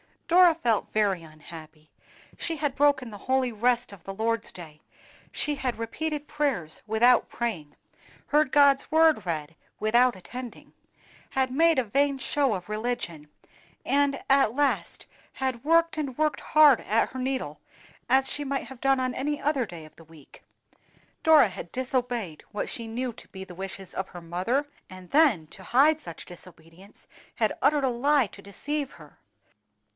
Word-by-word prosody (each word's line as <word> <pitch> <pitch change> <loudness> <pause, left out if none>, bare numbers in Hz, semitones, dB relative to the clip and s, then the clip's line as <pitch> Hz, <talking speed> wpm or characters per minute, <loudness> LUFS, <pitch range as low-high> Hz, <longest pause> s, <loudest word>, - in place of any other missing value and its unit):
DORA 345 -1 +6
felt 235 -9 0
very 200 -5 +1
unhappy. 155 0 -13 0.5
She 330 - -2
had 295 -3 -1
broken 280 -4 +2
the 205 - -8
holy 260 -1 +2
rest 240 +2 0
of 185 -4 -14
the 195 - -5
Lord's 225 +2 -1
day; 155 -4 -11 0.5
she 295 - 0
had 255 -4 -3
repeated 295 +6 -4
prayers 275 - -2
without 235 +3 +4
praying, 170 -12 -4 0.5
heard 300 -2 +2
God's 280 -2 +5
Word 315 - +4
read 160 -2 -4 0.2
without 240 +3 +3
attending, 245 +6 -9 0.6
had 260 -1 0
made 325 +3 +4
a 260 - +3
vain 275 +5 +1
show 275 -2 0
of 185 0 -6
religion; 215 -9 -4 0.6
and 280 0 +1
at 270 -4 +4
last 285 -1 0 0.3
had 260 -2 -3
worked 330 +1 +3
and 275 -5 -3
worked 305 -1 +1
hard 300 -5 +5
at 220 +3 +1
her 260 - -7
needle, 260 0 -3 0.5
as 265 0 +3
she 290 0 -3
might 275 -2 -3
have 260 0 -12
done 270 -1 +2
on 255 -1 -1
any 295 +2 -2
other 275 -5 0
day 165 -4 -10
of 155 - -17
the 165 - -14
week. 155 -3 -17 0.8
Dora 310 -8 +6
had 180 -2 -8
disobeyed 245 - -2
what 210 - -3
she 230 -2 -5
knew 245 +3 -3
to - - -14
be 190 0 -9
the 185 -2 -11
wishes 190 0 -7
of 190 - -3
her 175 - -10
mother, 185 - -1 0.2
and 185 -2 -12
then 280 - +4
to 190 - -14
hide 280 - +3
such 170 - -9
disobedience 175 +2 -12 0.3
had 220 -2 +1
uttered 285 +1 +3
a 265 - +2
lie 270 +1 +2
to 200 - -14
deceive 280 +8 -4
her! - - -16
245 Hz, 165 wpm, -26 LUFS, 195-280 Hz, 0.8 s, DORA